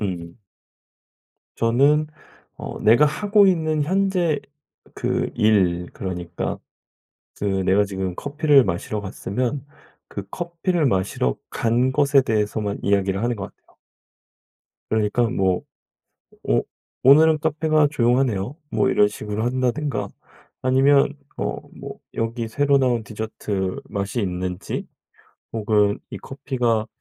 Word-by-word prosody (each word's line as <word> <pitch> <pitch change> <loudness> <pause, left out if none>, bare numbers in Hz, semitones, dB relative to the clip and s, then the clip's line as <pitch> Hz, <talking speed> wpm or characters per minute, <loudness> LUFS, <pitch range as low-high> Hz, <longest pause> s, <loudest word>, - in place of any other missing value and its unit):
음. 90 -2 -5 1.2
저는 140 +7 +3 0.5
어 - - -7
내가 120 +7 +5
하고 205 +6 +3
있는 160 -4 +1
현재 180 -2 +1 0.6
그 - - -1
일 90 -5 +2
그러니까 90 -2 -4 0.8
그 - - -4
내가 95 0 +2
지금 95 -2 -4
커피를 145 - +3
마시러 95 +3 -3
갔으면 120 +7 -3 0.4
그 100 -1 -7
커피를 175 -1 -1
마시러 95 - 0
간 120 +3 +1
것에 140 -1 +4
대해서만 105 -2 -1
이야기를 100 0 +1
하는 120 0 0
것 100 - -5
같아요. - - -31 1.1
그러니까 110 +2 +1
뭐 95 -6 +1 0.8
"오 - - +1 0.4
오늘은 155 +4 +6
카페가 155 -1 +2
조용하네요." 120 -3 +1
뭐 - - +1
이런 105 - +4
식으로 105 +1 -4
한다든가 125 -3 -1 0.5
아니면 135 +2 +4 0.2
어 - - -2 0.2
뭐 - - -8 0.2
여기 115 +1 -2
새로 140 +4 +2
나온 125 -4 +1
디저트 105 -3 -4
맛이 100 +4 -2
있는지, 90 0 -3 0.7
혹은 105 -2 +2
"이 - - -6
커피가 125 -5 -1
115 Hz, 240 characters per minute, -22 LUFS, 100-145 Hz, 1.2 s, 오늘은